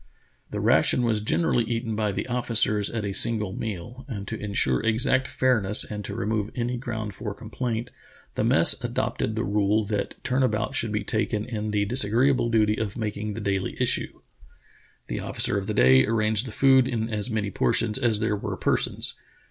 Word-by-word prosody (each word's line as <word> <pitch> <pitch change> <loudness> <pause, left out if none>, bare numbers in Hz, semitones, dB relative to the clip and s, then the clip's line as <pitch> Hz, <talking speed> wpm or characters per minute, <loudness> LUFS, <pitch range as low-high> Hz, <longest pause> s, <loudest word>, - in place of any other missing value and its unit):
" - - -41
The - - -4
ration 125 - +3
was 110 -3 +1
generally 120 +2 +1
eaten 115 -1 -3
by 105 -1 -1
the - - -4
officers 115 -4 +1
at 110 -3 -4
a 100 - -3
single 105 -3 +2
meal, 110 +5 -6
and 105 -7 -6
to 115 - -4
insure 100 - 0
exact 115 +4 +1
fairness, 110 -6 +3
and 105 -1 -7
to 100 - -6
remove 110 -1 -2
any 120 0 -2
ground 110 -4 -5
for 105 +1 -6
complaint, 115 +1 -4 0.4
the - - -2
mess - - +4
adopted 110 - -2
the 110 - -1
rule 105 0 +1
that 105 0 -3
turn 130 +1 0
about 110 -3 0
should 115 - -1
be 105 -1 -2
taken 110 0 -1
in 110 -3 -4
the 105 -1 0
disagreeable 120 +3 +2
duty 110 -2 +2
of 105 -1 -4
making 105 -1 -4
the - - -5
daily 100 -2 -2
issue. - - +1 0.9
The - - -4
officer - - 0
of - - -3
the - - -3
day 65 +1 +5
arranged 110 +1 +1
the - - -7
food 130 +2 +4
in 115 -3 -2
as 105 +3 0
many 105 -3 -2
portions 105 - +1
as 115 -5 +3
there 105 -1 0
were 100 - -5
persons. - - +2
110 Hz, 190 wpm, -25 LUFS, 105-120 Hz, 0.9 s, day